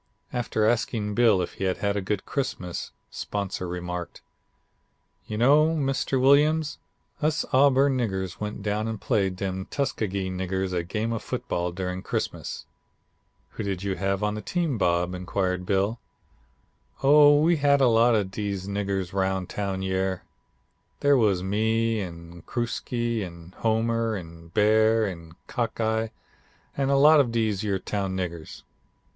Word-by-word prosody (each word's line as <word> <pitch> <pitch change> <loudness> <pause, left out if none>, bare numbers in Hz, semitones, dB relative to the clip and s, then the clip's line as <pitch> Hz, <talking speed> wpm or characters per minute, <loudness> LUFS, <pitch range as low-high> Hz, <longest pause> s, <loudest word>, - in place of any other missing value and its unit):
"After 115 -3 0
asking 110 -2 0
Bill 105 -5 +4
if - - -6
he - - +1
had 95 -1 0
had 100 0 -1
a 100 - 0
good 95 +1 -2
Christmas, 95 -11 -3 0.2
'Sponsor' 100 -2 -4
remarked: 90 0 -5 1.1
'You 105 - -4
know, 150 +7 +5
Mr. 135 -2 0
Williams, 150 +4 +3 0.4
us 155 +1 +1
Auburn 135 0 +4
niggers 95 -6 -2
went 105 -1 -5
down 105 +1 -1
and 110 -2 -4
played 100 -6 0
dem 95 0 -3
Tuskegee 100 -8 -2
niggers 95 0 -2
a 90 - +1
game 110 +6 -2
of 115 - -3
football 90 0 -3
during 90 +1 -4
Christmas.' - - -4 0.9
"'Who - - -6
did 95 -2 -3
you 100 -1 -1
have 100 +1 -1
on 105 0 +1
the 105 - -5
team, 165 -7 -1
Bob?' 90 0 +1
inquired 90 0 -2
Bill. 100 +4 +1 1.0
"'Oh 145 +1 +7
we 165 +2 +3
had 140 -1 +4
a 135 - +5
lot 115 0 +4
of 100 -3 0
dese 100 -2 -3
niggers 100 -2 -2
roun' 95 -1 0
town 95 0 -3
yere. 95 -1 -1 0.8
They 145 0 +4
was 105 -8 +3
me, 110 +3 +1
an' 85 -1 -8
Crooksie, 120 -1 -2
an' 85 0 -10
Homer, 115 0 +1
an' 85 -3 -9
Bear, 110 +4 +3
an' 85 -4 -7
Cockeye, 110 -2 -1 0.7
an' 135 -1 0
a 140 - +4
lot 150 +2 +7
of 130 -5 +2
dese 110 -4 0
yer 100 -3 0
town 95 0 -3
niggers.' 85 -3 -5
105 Hz, 150 wpm, -26 LUFS, 95-120 Hz, 1.1 s, Oh